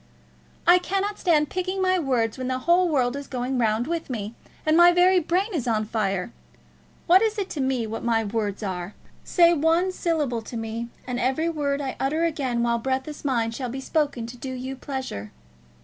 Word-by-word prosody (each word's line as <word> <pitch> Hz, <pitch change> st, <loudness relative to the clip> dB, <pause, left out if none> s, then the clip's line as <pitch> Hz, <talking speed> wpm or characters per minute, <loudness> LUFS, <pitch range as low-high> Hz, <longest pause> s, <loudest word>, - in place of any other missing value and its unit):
"I 350 Hz, +2 st, +7 dB
cannot 395 Hz, +3 st, -2 dB
stand 305 Hz, -4 st, +2 dB
picking 370 Hz, +1 st, -2 dB
my 370 Hz, -1 st, +2 dB
words 245 Hz, -7 st, 0 dB
when 255 Hz, -1 st, -4 dB
the 255 Hz, 0 st, 0 dB
whole 345 Hz, +6 st, +3 dB
world 255 Hz, -4 st, +1 dB
is 280 Hz, 0 st, -6 dB
going 250 Hz, 0 st, -2 dB
round 225 Hz, 0 st, +1 dB
with 330 Hz, +1 st, -3 dB
me, 220 Hz, -3 st, -4 dB, 0.3 s
and 310 Hz, 0 st, +3 dB
my 345 Hz, +1 st, +8 dB
very 360 Hz, +1 st, +5 dB
brain 370 Hz, +6 st, 0 dB
is 275 Hz, -8 st, -2 dB
on 215 Hz, -2 st, +1 dB
fire. 195 Hz, -4 st, -2 dB, 0.7 s
What 365 Hz, +2 st, +6 dB
is 440 Hz, -1 st, +1 dB
it 390 Hz, -2 st, -3 dB
to 290 Hz, -, -3 dB
me 260 Hz, -3 st, 0 dB
what 220 Hz, +1 st, -5 dB
my 230 Hz, -1 st, +2 dB
words 210 Hz, -1 st, -2 dB
are? 185 Hz, 0 st, -4 dB, 0.3 s
Say 345 Hz, -1 st, +5 dB
one 330 Hz, +4 st, +2 dB
syllable 300 Hz, -10 st, -1 dB
to 230 Hz, +2 st, -7 dB
me, 225 Hz, +1 st, -4 dB, 0.2 s
and 250 Hz, -1 st, -3 dB
every 265 Hz, +7 st, +1 dB
word 290 Hz, -3 st, -1 dB
I 270 Hz, -2 st, -4 dB
utter 310 Hz, +5 st, +1 dB
again 265 Hz, -7 st, -1 dB
while 235 Hz, 0 st, +1 dB
breath 260 Hz, +3 st, -1 dB
is 300 Hz, -, -8 dB
mine 235 Hz, -5 st, 0 dB
shall 250 Hz, +2 st, -4 dB
be 265 Hz, +3 st, -5 dB
spoken 280 Hz, -4 st, -1 dB
to 240 Hz, +2 st, -9 dB
do 260 Hz, +2 st, -6 dB
you 260 Hz, +1 st, -5 dB
pleasure. 260 Hz, -, -5 dB
265 Hz, 200 wpm, -25 LUFS, 235-335 Hz, 0.7 s, my